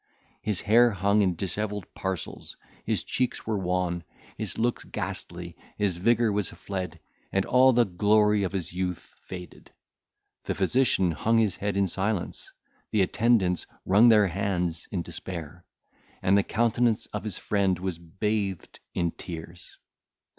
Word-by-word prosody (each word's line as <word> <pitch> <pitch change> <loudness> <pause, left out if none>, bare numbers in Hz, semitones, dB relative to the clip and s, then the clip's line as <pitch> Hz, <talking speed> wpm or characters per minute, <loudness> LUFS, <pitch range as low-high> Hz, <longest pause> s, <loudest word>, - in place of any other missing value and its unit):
His 105 -3 -1
hair 120 +3 +5
hung 100 0 +2
in 95 -3 +2
dishevelled 105 +2 -3
parcels, 95 -4 -5 0.3
his - - 0
cheeks 125 -1 -1
were 110 -2 -1
wan, 90 -2 -1 0.3
his - - -4
looks 120 +1 0
ghastly, - - -5 0.2
his 100 -4 0
vigour 115 +4 +3
was 100 -3 0
fled, 90 -4 -5 0.3
and 95 0 +1
all 130 +1 +6
the 120 -1 +4
glory 105 +3 +3
of 95 - -1
his 90 -4 -3
youth 90 -1 -4
faded; 90 -1 -10 0.8
the - - -1
physician 100 -2 +2
hung 115 +8 +1
his 110 -4 +2
head 100 -1 -2
in 100 - +3
silence, 95 +1 -1 0.4
the 105 -3 +3
attendants 100 -4 +2 0.2
wrung 105 +6 +6
their 105 -2 +6
hands 90 -3 -2
in 90 -4 -2
despair, 85 -1 -7 0.6
and 95 - +4
the 100 - +5
countenance 115 +2 +1
of 105 - -3
his 105 -4 -4
friend 100 -3 +1
was 90 -2 -4
bathed 100 +2 -3 0.2
in 85 -1 +1
tears. 85 +1 -9
100 Hz, 145 wpm, -27 LUFS, 90-110 Hz, 0.8 s, all